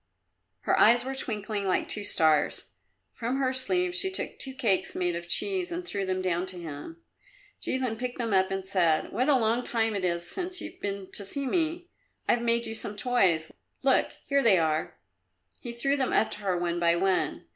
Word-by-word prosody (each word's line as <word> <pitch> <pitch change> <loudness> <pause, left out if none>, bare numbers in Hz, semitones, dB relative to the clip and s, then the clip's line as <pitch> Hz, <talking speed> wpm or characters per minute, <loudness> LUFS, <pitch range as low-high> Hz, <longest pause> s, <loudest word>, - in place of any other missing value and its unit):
Her - - +1
eyes 240 +3 +6
were 265 - -3
twinkling 210 -5 -3
like 185 - +1
two 210 - +1
stars. 155 -6 +2 0.4
From 245 +3 -3
her 260 -1 +1
sleeve 360 +7 +2
she 380 +1 +1
took 380 - 0
two 265 -1 0
cakes 225 -8 0
made 175 -1 0
of 170 0 -6
cheese 370 - 0
and 350 +1 -4
threw 200 - -3
them 185 0 -1
down 180 0 0
to 185 -1 -4
him. 170 - -8 0.6
Jilin 255 -4 -1
picked 250 0 -4
them 230 -4 -1
up 190 0 +3
and 195 0 -3
said, 175 -5 +1
"What 255 +7 +1
a 280 - +6
long 230 +1 +1
time 225 -3 0
it 195 - -2
is 170 -1 -1
since 360 - -4
you've 340 +4 -9
been 200 -1 -4
to 205 - -3
see 275 +8 -4
me! 335 +4 -1 0.4
I've 240 - +3
made 235 0 +1
you 225 - -4
some 215 -2 -4
toys. 195 -9 +2 0.3
Look, - - +3
here 280 -1 +2
they 215 -7 +5
are!" 155 - 0 0.6
He 240 - -6
threw 275 +4 0
them 265 -2 0
up 220 - +3
to - - -5
her 190 -3 -1
one 175 0 -1
by 170 0 +3
one. 190 +1 0
220 Hz, 200 wpm, -28 LUFS, 185-265 Hz, 0.6 s, eyes